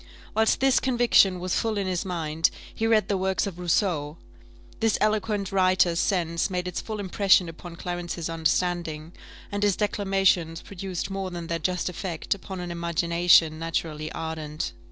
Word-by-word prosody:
Whilst 220 0 +2
this 270 -1 +4
conviction 240 -7 +4
was 180 0 -1
full 220 -2 -1
in 200 - -1
his 185 -2 -1
mind, 165 -3 0 0.2
he 225 - -1
read 220 -2 +3
the 195 -2 0
works 190 0 0
of 185 -3 -6
Rousseau: 170 -4 0 0.6
this 225 -2 +2
eloquent 210 -2 0
writer's 185 -3 +3
sense 170 -4 0
made 180 -1 -2
its 180 - -3
full 215 -2 -5
impression 195 -2 +3
upon 165 +1 -9
Clarence's 175 -1 -4
understanding, 165 -1 -1 0.4
and 205 0 -2
his 205 -2 +3
declamations 195 -5 +1
produced 190 0 -5
more 195 -1 -3
than 175 -2 -6
their 165 0 -2
just 180 +2 -1
effect 180 -2 -2
upon 190 -1 -8
an 175 -1 -5
imagination 170 -1 +3
naturally 160 -1 -3
ardent. 155 - -4
180 Hz, 155 wpm, -26 LUFS, 165-195 Hz, 0.6 s, this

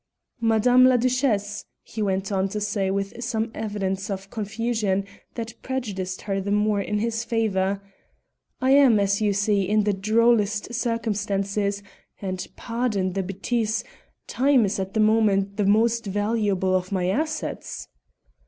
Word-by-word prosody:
"Madame 235 +3 +5
la 255 -1 +5
Duchesse," 235 -5 0 0.2
he 220 - -6
went 195 0 -1
on 195 0 0
to 210 - -3
say 200 -2 -1
with 195 +4 -3
some 225 -2 -2
evidence 200 -2 -3
of 195 0 -5
confusion 215 -2 -1 0.3
that 230 -1 -5
prejudiced 200 -8 -4
her 195 -1 -1
the 195 - -4
more 210 0 +2
in 210 +1 -2
his 225 +1 -1
favour, 200 -4 0 0.8
"I 260 0 +2
am, 270 -6 +6
as 200 +1 +1
you 210 -1 +2
see, 200 -1 +1
in 215 0 +3
the 205 0 +1
drollest 215 +1 +2
circumstances, 205 -4 -1 0.4
and 185 -2 -4
pardon 225 -6 -1
the 195 - -1
bêtise 215 +4 -1 0.4
time 265 -3 +3
is 200 0 -2
at 190 +2 -4
the - - +2
moment 210 -2 +3
the 205 - +1
most 230 +2 +2
valuable 205 -2 0
of 185 +1 -1
my 185 -2 0
assets." 310 +10 -3
210 Hz, 145 wpm, -24 LUFS, 195-230 Hz, 0.8 s, am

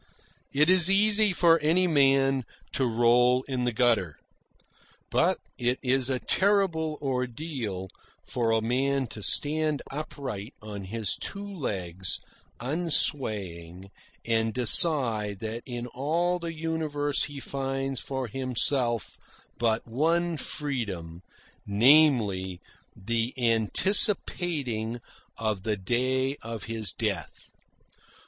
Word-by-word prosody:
It 150 +3 +3
is 185 -1 +5
easy 210 +1 +4
for 170 -2 +4
any 165 +5 +2
man 135 -4 +3 0.3
to 130 -2 0
roll 120 +2 +3
in 130 -2 -3
the 120 - +1
gutter. 110 - +1 0.9
But - - +2 0.2
it 125 +1 +1
is 130 0 +1
a 130 - +1
terrible 170 -3 +1
ordeal 125 - -3 0.4
for 120 -2 -1
a 115 0 +2
man 135 +3 0
to 105 - -8
stand 150 +5 +1
upright 135 -6 -6
on 105 -2 -8
his 110 +1 -3
two 200 0 -6
legs 95 - -3 0.4
unswaying, 105 - -1 0.3
and 115 0 0
decide 120 - +5
that 110 +1 -4
in 120 -1 -5
all 165 +8 -1
the 170 -1 -4
universe 155 -3 -1
he 145 -1 -8
finds 135 -1 -3
for 130 +1 -4
himself 125 -2 -1 0.4
but 115 -1 0
one 165 +8 +1
freedom 105 - -4 0.5
namely, 105 - +4 0.4
the 115 +4 -2
anticipating 120 - +1 0.4
of 110 -3 -2
the 105 +1 -2
day 130 +7 0
of 115 -1 -7
his 110 -4 -4
death. - - -4
130 Hz, 110 wpm, -27 LUFS, 110-150 Hz, 0.9 s, is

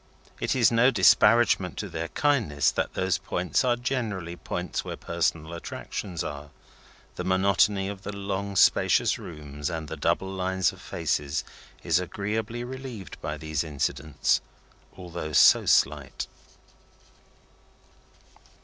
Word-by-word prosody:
It - - 0
is 120 -3 +4
no 115 +2 +5
disparagement 110 -7 +4
to 105 - -3
their 85 -2 -4
kindness 110 - +1
that - - -2
those 95 -2 0
points 90 -3 -1
are 125 -2 +3
generally 110 -9 -3
points - - -4
where - - -6
personal 80 +1 -2
attractions 85 +1 -5
are. 75 0 -6 0.7
The - - -3
monotony 95 +1 +2
of 100 -1 -6
the 105 - -5
long 100 0 -4
spacious - - +4
rooms 75 -2 -6
and 80 -3 -4
the 80 - -5
double 85 +5 0
lines 95 0 0
of - - -14
faces 75 +1 -2 0.4
is - - +2
agreeably 110 +6 -3
relieved 130 -5 -8
by 75 0 -4
these 80 -1 -2
incidents, 75 -4 0 0.6
although 85 -4 -6
so - - +6
slight. 70 -2 +2
95 Hz, 125 wpm, -26 LUFS, 80-105 Hz, 0.7 s, so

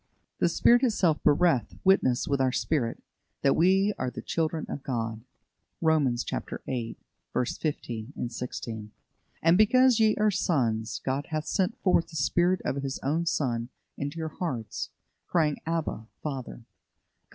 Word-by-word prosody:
The - - +3
Spirit 240 +1 +5
itself 195 - +2
beareth 145 - +3
witness 160 -10 +3
with 140 -1 +1
our 130 -1 +3
spirit, 125 -3 -1 0.4
that 140 - +4
we 190 +4 +4
are 130 - -1
the - - -8
children 160 -1 -1
of 140 - -5
God" 115 -4 -3 0.6
(Romans 145 -7 +2 0.4
viii. 120 -4 -3 0.4
15, 125 -2 -3
16). 115 -3 -6 0.5
"And 165 +2 +5
because 255 +2 +5
ye 215 -1 +4
are 210 0 +3
sons, 120 - 0
God 135 +2 -1
hath 155 -1 -2
sent 195 +2 0
forth 180 -3 +3
the 160 - -13
Spirit 175 +6 +2
of 135 - -1
His 135 -1 -3 0.3
Son 125 -8 -1 0.3
into 145 +3 -4
your 160 -1 -3
hearts, 125 - -4 0.4
crying, 155 -4 +1
Abba, 160 -9 -2 0.2
Father" 135 -5 -4
(Gal. 115 - -16
145 Hz, 140 wpm, -28 LUFS, 125-175 Hz, 0.6 s, Spirit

